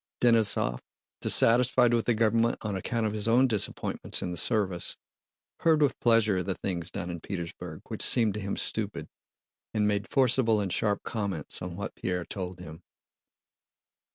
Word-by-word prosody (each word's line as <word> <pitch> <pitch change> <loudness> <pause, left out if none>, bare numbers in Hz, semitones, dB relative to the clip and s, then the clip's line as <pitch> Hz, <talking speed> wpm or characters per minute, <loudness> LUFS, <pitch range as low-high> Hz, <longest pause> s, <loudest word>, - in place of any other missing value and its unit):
Denísov, 110 - +3 0.4
dissatisfied 120 +1 +4
with 115 -1 +1
the 120 - +3
government 115 +1 +2
on 105 -3 -2
account 115 +4 -2
of 105 - -1
his 105 0 -2
own 120 +3 +5
disappointments 110 -6 -1
in 90 - -3
the - - -4
service, 95 -3 -1 0.6
heard 160 -2 +3
with 145 -3 +1
pleasure 115 -4 +3
of 90 0 -3
the 95 - -1
things 85 -3 -4
done 85 -1 -5
in 85 - -6
Petersburg 85 -3 -6
which - - -5
seemed 110 -4 +4
to 105 - -4
him 100 -1 -4
stupid, - - -3 0.7
and 105 -1 +2
made 100 -1 -1
forcible 125 -4 +3
and 95 -3 -1
sharp 105 -2 0
comments 100 -9 -3
on - - -5
what - - -5
Pierre 90 -1 -3
told 90 -2 -6
them. 80 -2 -10
105 Hz, 165 wpm, -28 LUFS, 90-115 Hz, 0.7 s, own